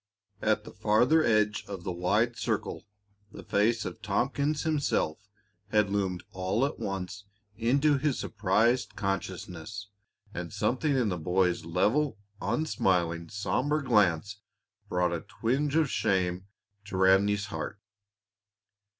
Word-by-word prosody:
At -, -, +1 dB
the -, -, -10 dB
farther 125 Hz, +10 st, +3 dB
edge 110 Hz, -3 st, +2 dB
of 95 Hz, -3 st, -6 dB
the 90 Hz, -, -3 dB
wide 105 Hz, +7 st, +1 dB
circle -, -, -3 dB, 0.4 s
the -, -, -10 dB
face 110 Hz, +2 st, +1 dB
of -, -, -6 dB
Tompkins 135 Hz, +8 st, 0 dB
himself 145 Hz, -, 0 dB, 0.5 s
had 105 Hz, -2 st, +2 dB
loomed 95 Hz, -3 st, -1 dB
all 95 Hz, +7 st, 0 dB
at 145 Hz, -, -4 dB
once 95 Hz, +1 st, -4 dB, 0.3 s
into 140 Hz, +6 st, +2 dB
his 140 Hz, -1 st, 0 dB
surprised 110 Hz, +4 st, +1 dB
consciousness, 95 Hz, 0 st, -4 dB, 0.4 s
and 85 Hz, -1 st, -5 dB
something 125 Hz, +8 st, 0 dB
in 120 Hz, -5 st, +2 dB
the 90 Hz, -2 st, -2 dB
boy's 90 Hz, 0 st, +1 dB
level, 110 Hz, -, +1 dB, 0.2 s
unsmiling, 90 Hz, -, 0 dB
somber 140 Hz, -, 0 dB
glance 105 Hz, -, +2 dB, 0.5 s
brought 90 Hz, -1 st, +1 dB
a 85 Hz, -, -2 dB
twinge 140 Hz, +6 st, -1 dB
of 160 Hz, -2 st, +4 dB
shame 95 Hz, -2 st, 0 dB, 0.4 s
to 100 Hz, -2 st, -5 dB
Ranleigh's 100 Hz, +2 st, +4 dB
heart. 100 Hz, -, -4 dB
105 Hz, 125 wpm, -29 LUFS, 95-125 Hz, 0.5 s, of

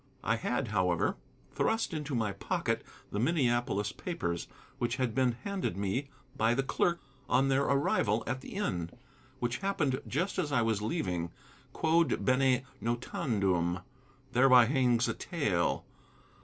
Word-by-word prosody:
I 115 Hz, -, +2 dB
had, 125 Hz, +1 st, -1 dB
however, 90 Hz, -4 st, +1 dB, 0.4 s
thrust 225 Hz, -4 st, 0 dB
into 150 Hz, -3 st, -3 dB
my 110 Hz, -3 st, 0 dB
pocket 100 Hz, -, -1 dB, 0.3 s
the 105 Hz, -, -2 dB
Minneapolis 120 Hz, -, +1 dB
papers, 85 Hz, -, -3 dB, 0.3 s
which 120 Hz, 0 st, 0 dB
had 130 Hz, -4 st, -1 dB
been 130 Hz, -1 st, +2 dB
handed 195 Hz, -, -2 dB
me 100 Hz, +8 st, -1 dB, 0.3 s
by 120 Hz, -3 st, +2 dB
the 135 Hz, -, +1 dB
clerk 170 Hz, +5 st, +1 dB, 0.3 s
on 135 Hz, +1 st, +3 dB
their 135 Hz, +1 st, +3 dB
arrival 115 Hz, -6 st, +2 dB
at 130 Hz, 0 st, -3 dB
the -, -, -9 dB
inn, 90 Hz, -, -1 dB, 0.5 s
which 120 Hz, 0 st, -1 dB
happened 155 Hz, -9 st, 0 dB
just 180 Hz, +8 st, -1 dB
as 150 Hz, -5 st, -1 dB
I 125 Hz, -5 st, +3 dB
was 110 Hz, -2 st, +1 dB
leaving. 90 Hz, -, -1 dB, 0.4 s
'Quod 160 Hz, -1 st, +2 dB
bene 130 Hz, 0 st, +3 dB, 0.2 s
notandum!' 100 Hz, -7 st, 0 dB, 0.5 s
Thereby 125 Hz, -1 st, +7 dB
hangs 125 Hz, -2 st, +2 dB
a -, -, 0 dB
tale! 105 Hz, -, -1 dB
125 Hz, 140 wpm, -31 LUFS, 105-140 Hz, 0.5 s, Thereby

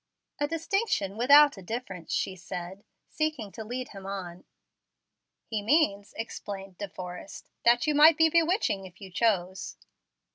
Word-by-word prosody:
"A 290 Hz, -, +1 dB
distinction 330 Hz, -, -1 dB
without 285 Hz, +3 st, +6 dB
a -, -, -9 dB
difference," 190 Hz, -4 st, -6 dB
she 190 Hz, -, -1 dB
said, 180 Hz, +2 st, -7 dB, 0.2 s
seeking 305 Hz, -10 st, -2 dB
to 220 Hz, -, -7 dB
lead 250 Hz, +3 st, -5 dB
him 195 Hz, -1 st, -10 dB
on. 185 Hz, -3 st, -6 dB, 1.0 s
"He 215 Hz, -2 st, -3 dB
means," 205 Hz, -5 st, +1 dB
explained 195 Hz, -4 st, -7 dB
De 205 Hz, -1 st, -4 dB
Forrest, 180 Hz, +1 st, -9 dB
"that 240 Hz, 0 st, +5 dB
you 305 Hz, -, +2 dB
might 300 Hz, +2 st, +7 dB
be 325 Hz, -, +6 dB
bewitching 330 Hz, -, +1 dB
if 180 Hz, 0 st, -18 dB
you 195 Hz, -2 st, -10 dB
chose." 190 Hz, -3 st, 0 dB
210 Hz, 145 wpm, -28 LUFS, 190-290 Hz, 1.0 s, might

